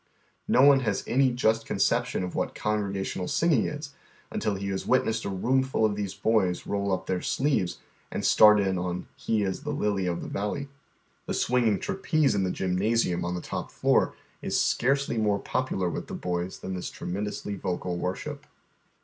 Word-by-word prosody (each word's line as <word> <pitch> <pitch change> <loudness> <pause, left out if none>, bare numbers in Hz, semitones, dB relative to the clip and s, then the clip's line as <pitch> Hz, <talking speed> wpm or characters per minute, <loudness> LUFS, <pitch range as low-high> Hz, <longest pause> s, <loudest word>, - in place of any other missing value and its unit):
Xo 130 - +6
one 140 -1 +7
has 110 -6 -1
any 130 +1 +3
just 115 -2 +1
conception 120 +2 +1
of 90 - -4
what - - -2
congregation 100 -3 -2
a! 90 - -2
singing 160 -8 +2
is 150 -1 -6 0.4
until 105 - -1
lie 95 - -6
has 100 -1 -3
witnessed 115 -3 +2
a - - -1
TOomful 130 +5 +1
of 105 -2 +1
these 100 -2 -3
boys 95 -3 +1
roll 100 0 -1
np - - -14
their 90 -1 -1
sleeves 130 -11 0 0.3
and - - -3
start 105 -1 +7
in 95 -2 +1
on 90 0 -3
" - - -15
I - - +1
am 105 -4 +2
a 150 - -4
lily 105 -9 0
of 85 -1 -2
the - - -6
valley." 140 +8 -3 0.6
The - - -1
swinging 120 -4 +2
trapeze 160 -7 +1
in 100 -2 +1
the 95 - 0
gymnasium 95 +1 0
on 90 +1 -2
the 90 - -4
top - - -5
floor - - +2 0.3
is - - 0
scarcely 135 -2 +1
more 105 -2 +2
popular 100 -5 -1
with 85 - -4
the - - -6
boys 90 +1 -3
than 95 - -6
this 90 - -4
tremendously 105 +2 -4
vocal 90 -2 -3
worship. 90 +1 -4
105 Hz, 185 wpm, -27 LUFS, 95-125 Hz, 0.6 s, one